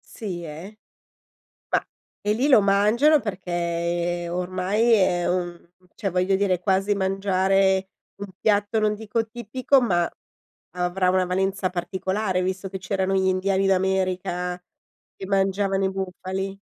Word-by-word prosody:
Sì, 185 -6 -5
eh. 170 +7 -9 0.9
Ma - - +1 0.4
e 210 +1 +1
lì 250 +6 +1
lo 265 -7 +7
mangiano 210 +10 +4
perché 175 -3 -2
ormai 185 +6 +1
è 180 -4 +3
un 175 -1 -3 0.2
cioè 200 -3 -3
voglio 185 +2 +1
dire 190 -2 +2
è - - -9
quasi 195 +2 +1
mangiare 190 0 +1 0.3
un - - -3
piatto, 210 +1 +2
non 215 0 +1
dico 225 +1 -2
tipico, 245 +4 +1
ma 175 -8 +1 0.7
avrà 180 +1 +1
una 185 0 +2
valenza 190 +1 0
particolare 190 +2 -2
visto 190 +1 -3
che 190 - -5
c'erano 190 0 -1
gli 190 0 +2
indiani 190 +1 +1
d'America 185 -2 0 0.6
che 190 - -6
mangiavano 195 0 +1
i 190 - +1
bufali? 190 +1 -4
190 Hz, 135 wpm, -24 LUFS, 180-200 Hz, 0.9 s, lo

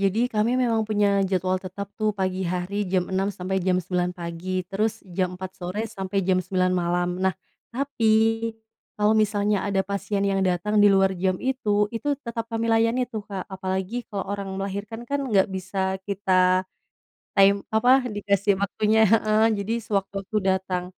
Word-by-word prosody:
Jadi, 215 +6 +1
kami 220 +4 +2
memang 230 -3 +2
punya 205 -2 +2
jadwal 185 0 0
tetap, 195 +2 -7
tuh, 215 0 +2
pagi 185 -1 -1
hari 185 +3 -2
jam 180 -1 +1
6:00 195 +1 +1
sampai 190 -1 -2
jam 185 0 +1
9:00 180 0 -1
pagi, 175 +2 -4
terus 210 +4 -2
jam 180 0 -2
4:00 185 0 -6
sore 180 +4 -3
sampai 195 -3 -4
jam 185 0 +2
9:00 185 0 0
malam. 175 0 0
Nah, 190 -1 +1 0.3
tapi, 225 -3 +1 0.5
kalau 210 0 +3
misalnya 205 -1 +1
ada 200 -1 +1
pasien 200 +1 -2
yang 195 -1 +1
datang 185 +3 0
di 205 - +7
luar 195 0 +4
jam 185 +1 0
itu, 210 -6 +1
itu 280 +6 -1
tetap 230 -1 -4
kami 230 0 -2
layani, 230 +3 +2
tuh, 220 -3 -5
Kak. 195 -3 -4
Apalagi 190 +5 -3
kalau 200 -2 -4
orang 200 -1 -4
melahirkan, 200 +4 -5
kan, 285 0 0
nggak 200 -3 +3
bisa 190 0 -2
kita, 185 -2 +2 0.7
time 200 0 +5
apa, 250 +4 +4
dikasih 200 -1 +1
waktunya 215 +2 +3
heeh, 215 0 +3
jadi 200 +2 -3
sewaktu-waktu 195 0 -2
datang. 190 -1 0
200 Hz, 165 wpm, -24 LUFS, 185-215 Hz, 0.7 s, di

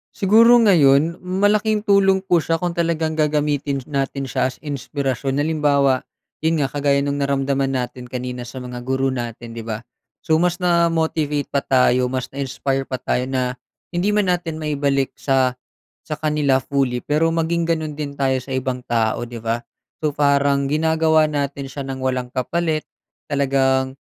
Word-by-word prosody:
Siguro 225 +5 +6
ngayon 165 -6 +4
malaking 205 +3 +1
tulong 195 -2 +3
po 175 -3 +3
siya 165 +1 0
kung 175 +1 -2
talagang 165 -2 0
gagamitin 150 -2 0
sh 130 - -7
natin 135 -1 -2
siya 130 - 0
as 130 - -12
inspirasyon. 140 -1 -3
Halimbawa, 145 -3 +2 0.4
'yon 160 +1 +1
nga 145 - +1
kagaya 140 -1 +2
no'ng 140 0 -1
naramdaman 140 0 0
natin 125 -1 -4
kanina 125 0 -5
sa 120 +2 -9
mga 125 -1 -6
guro 130 +1 0
natin 120 -1 -6
'di 115 - -6
ba? 110 0 -6 0.4
So, 160 - +3
mas 175 -1 +1
na-motivate 165 -4 +1
pa 140 - +2
tayo 125 -1 +3
mas 130 0 -2
na-inspire 135 0 -2
pa 130 - -2
tayo 125 0 -1
na 130 -1 -1 0.4
hindi 175 +4 +1
man 210 -2 +2
natin 165 -3 -3
maibalik 140 -3 0
sa, 130 -2 +1 0.5
sa 150 - -5
kanila 150 -3 +2
fully 135 -2 0
pero 155 +3 +2
maging 165 +1 0
gano'n 160 -2 -1
din 145 -1 -5
tayo 135 -1 +1
sa 135 - -14
ibang 130 -1 -2
tao, 115 -2 +1
'di 120 - -7
ba? 115 +1 -1 0.4
So 155 - +1
parang 140 -1 +2
ginagawa 160 +1 +2
natin 140 -2 -3
siya 140 0 -6
nang 135 -1 -5
walang 125 -1 -2
kapalit. 155 +4 -1 0.5
Talagang 135 -2 +1
140 Hz, 160 wpm, -21 LUFS, 130-160 Hz, 0.5 s, Siguro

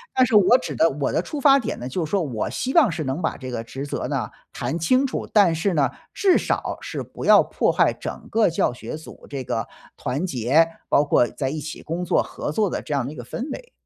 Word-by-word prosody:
但 255 - +5
是 225 - 0
我 210 +4 +7
指 255 - -5
的 165 - +4
我 140 0 -2
的 - - +1
出 295 - -6
发 275 0 +6
点 245 - -4
呢， 120 - -5
就 165 +7 -2
说 180 +4 0
我 120 -8 -3
希 260 +2 -3
望 295 - +5
是 160 -1 -3
能 135 +4 -3
把 160 - -1
这 130 -1 -7
个 115 -2 -3
职 135 +4 -6
责 145 - -3
呢， - - -2 0.2
谈 135 +7 -3
清 255 - +3
楚， 265 - -3
但 200 -6 +5
是 170 +3 0
呢， 140 -5 +2 0.2
至 380 -2 +3
少 - - -2
是 - - -5
不 - - -10
要 - - +7
破 - - 0
坏 - - +3
整 - - -7
个 225 -3 +3
教 160 -6 0
学 125 +3 -7
组 160 - -13
这 140 -2 -4
个 115 -2 -2 0.3
团 145 +8 -2
结， 140 +2 +3 0.2
包 145 - +4
括 120 -4 +3
在 135 +1 -3
一 155 - -4
起 155 +1 -7
工 170 +3 -3
作、 175 - +2
合 - - -5
作 210 +7 +1
的 - - -3
这 145 - -3
样 135 -3 0
的 140 - -6
一 - - -12
个 120 - -7
氛 240 - -5
围， - - -10
160 Hz, 275 characters per minute, -23 LUFS, 135-210 Hz, 0.3 s, 我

